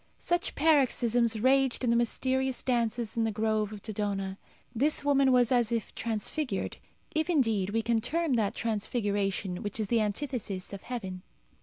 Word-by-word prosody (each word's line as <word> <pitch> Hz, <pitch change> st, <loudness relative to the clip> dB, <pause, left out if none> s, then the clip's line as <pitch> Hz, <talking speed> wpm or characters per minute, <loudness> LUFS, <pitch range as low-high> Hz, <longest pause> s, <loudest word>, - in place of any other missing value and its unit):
Such 350 Hz, 0 st, -1 dB
paroxysms 245 Hz, -7 st, +3 dB
raged 265 Hz, +2 st, +3 dB
in 240 Hz, -, +2 dB
the -, -, +3 dB
mysterious 260 Hz, +2 st, 0 dB
dances 235 Hz, -2 st, 0 dB
in 230 Hz, -, +1 dB
the 225 Hz, -, +1 dB
grove 215 Hz, 0 st, 0 dB
of 210 Hz, -2 st, -9 dB
Dodona. 200 Hz, -2 st, -3 dB, 0.3 s
This 285 Hz, +5 st, +2 dB
woman 275 Hz, -2 st, +4 dB
was 250 Hz, -1 st, +4 dB
as 240 Hz, -3 st, +3 dB
if 230 Hz, -3 st, -2 dB
transfigured 225 Hz, +1 st, -2 dB, 0.4 s
if, 315 Hz, +2 st, 0 dB
indeed, 225 Hz, -, +2 dB
we 225 Hz, +2 st, 0 dB
can 230 Hz, 0 st, +1 dB
term 320 Hz, +4 st, 0 dB
that 220 Hz, -2 st, +1 dB
transfiguration 205 Hz, -4 st, -1 dB
which 205 Hz, +1 st, -4 dB
is 210 Hz, -2 st, -2 dB
the 235 Hz, -2 st, +3 dB
antithesis 210 Hz, -4 st, -3 dB
of 195 Hz, -, -6 dB
heaven. 190 Hz, -7 st, -5 dB
230 Hz, 160 wpm, -29 LUFS, 210-260 Hz, 0.4 s, woman